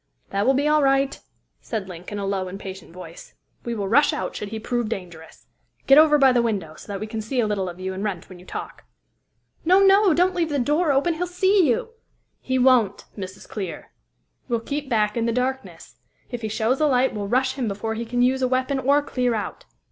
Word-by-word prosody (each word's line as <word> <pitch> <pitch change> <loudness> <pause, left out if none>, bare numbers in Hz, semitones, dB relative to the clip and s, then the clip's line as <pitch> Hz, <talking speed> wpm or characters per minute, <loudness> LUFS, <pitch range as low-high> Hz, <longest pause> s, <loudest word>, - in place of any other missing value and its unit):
"That 200 +3 0
will 265 - +4
be 285 +3 +1
all 305 0 +4
right," 275 0 +2 0.4
said 215 -5 -4
Link 180 0 -9
in 205 - -4
a 200 - -3
low, 195 -1 -2
impatient 190 -1 -8
voice. 185 - -12 0.3
"We 235 -1 -3
will 200 -3 -3
rush 290 +9 +4
out 300 - -4
should 205 - -5
he 220 +1 -5
prove 240 0 -2
dangerous. 175 -6 -8 0.4
Get 275 +2 +7
over 305 -1 +6
by 270 -2 +5
the 245 -1 +3
window, 200 -9 -2
so - - -14
that 200 - -4
we 215 - -4
can 220 0 -5
see 245 +4 -3
a 235 - +3
little 200 -3 -1
of 175 +1 -10
you 190 0 -4
and 190 +2 -5
Wrent 195 -5 -4
when 185 -1 -12
you 180 - -15
talk." - - -7 0.8
"No! 370 +4 +5
no! 395 0 +5
Don't 365 +2 +3
leave 340 -3 0
the 290 - -1
door 295 +5 +2
open! 280 +5 +2
He'll 355 +3 -3
see 375 0 +3
you!" 240 - 0 0.5
"He 260 0 -1
won't, 250 -6 +3
Mrs. 190 -1 -8
Clear. 190 -5 -6 0.6
We'll 235 -3 -1
keep 285 +3 -4
back 210 -3 +1
in 235 -1 0
the - - +1
darkness. 260 +2 -4 0.3
If 245 -2 -5
he 220 - -2
shows 225 +6 0
a 305 - +4
light, 260 -1 +2
we'll 205 -1 -4
rush 260 +4 +1
him 260 -4 -3
before 210 +2 -3
he 225 +1 -4
can 245 +1 0
use 260 +1 +2
a 255 - +2
weapon 260 +2 0
or 280 +3 +3
clear 250 -4 -1
out. 210 - -5
240 Hz, 230 wpm, -23 LUFS, 200-275 Hz, 0.8 s, Get